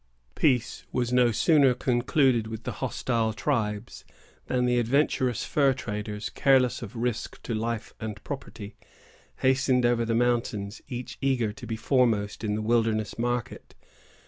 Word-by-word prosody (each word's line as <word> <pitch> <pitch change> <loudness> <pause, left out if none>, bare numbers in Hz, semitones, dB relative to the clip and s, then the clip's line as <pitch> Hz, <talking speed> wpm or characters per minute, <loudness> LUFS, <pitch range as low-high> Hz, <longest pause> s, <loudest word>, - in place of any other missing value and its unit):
Peace 125 -6 +1
was 125 -1 -1
no 125 -1 +4
sooner 135 +3 +4
concluded 125 -1 +2
with 110 +1 -7
the - - -3
hostile 115 -3 0
tribes, 110 -4 -2 0.4
than 125 -1 +1
the 125 0 +2
adventurous 125 0 +1
fur 140 -3 +2
traders, 105 -3 -5
careless 130 -2 +3
of 115 0 -8
risk 120 -1 -3
to 115 - -3
life 115 0 -3
and 105 -2 -6
property, 115 -7 -7 0.7
hastened 130 -1 +3
over 120 -1 +2
the 115 0 0
mountains, 115 -3 0
each 125 -1 -6
eager 125 -6 +1
to 120 - -10
be 110 - -2
foremost 110 -4 +1
in 105 -1 0
the 110 - -3
wilderness 110 -1 0
market. 120 0 -3
120 Hz, 145 wpm, -27 LUFS, 110-125 Hz, 0.7 s, no